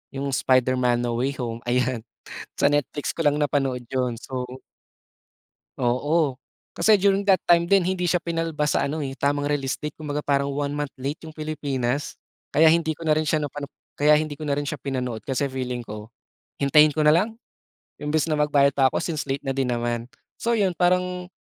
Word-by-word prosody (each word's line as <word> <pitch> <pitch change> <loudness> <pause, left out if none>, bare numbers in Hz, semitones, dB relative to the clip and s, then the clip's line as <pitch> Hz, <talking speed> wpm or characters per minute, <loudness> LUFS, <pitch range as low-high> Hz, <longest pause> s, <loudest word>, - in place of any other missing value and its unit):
'yung 135 - -3
Spider-Man: 125 -2 +2
No 120 0 -1
Way 140 +1 -1
Home, 115 -2 -4
ayan, 125 -1 +1 0.5
sa 140 - +3
Netflix 145 0 -1
ko 165 -3 -1
lang 145 - +4
napanood 135 -3 0
'yun, 125 -2 0
so 130 -1 -5 1.3
Oo, 135 +3 +1 0.3
kasi 215 -1 +4
during 195 0 +3
that 190 - +7
time 170 0 +4
din 195 -3 +4
hindi 180 -1 0
siya 175 - +3
pinalabas 165 -3 -1
sa - - +1
ano 150 0 -3
eh, 135 - -4
tamang 145 +1 0
realistic 145 +1 -2
kumbaga 150 -1 -5
parang 140 -1 +1
one 140 0 -2
month 145 -1 -3
late 140 +4 -4
'yung 160 -1 -11
Pilipinas 145 -4 -2 0.3
kaya 155 - +3
hindi 160 -2 +1
ko 165 - -9
na 155 - +3
rin 155 0 +1
siya 150 -1 +1
napano 145 0 -6 0.2
kaya 150 +1 +4
hindi 150 -1 -3
ko - - -4
na 140 - +1
rin 145 - -1
siya 150 - -3
pinanood, 125 -4 -3
kasi 135 +1 -1
feeling 125 -2 -3
ko, 105 0 -8 0.5
hintayin 150 +2 +5
ko 155 - +2
nalang 180 +9 +3 0.6
imbes 155 +2 0
na 150 - +1
magbayad 140 -1 +4
pa 135 -1 +3
ako - - -2
since 155 -4 -3
late 135 +1 -2
na 135 - -1
din 135 -1 -1
naman. 120 -1 -2 0.3
So 235 0 +1
'yun, 195 -4 +2
parang 180 +1 0
145 Hz, 190 wpm, -24 LUFS, 130-155 Hz, 1.3 s, that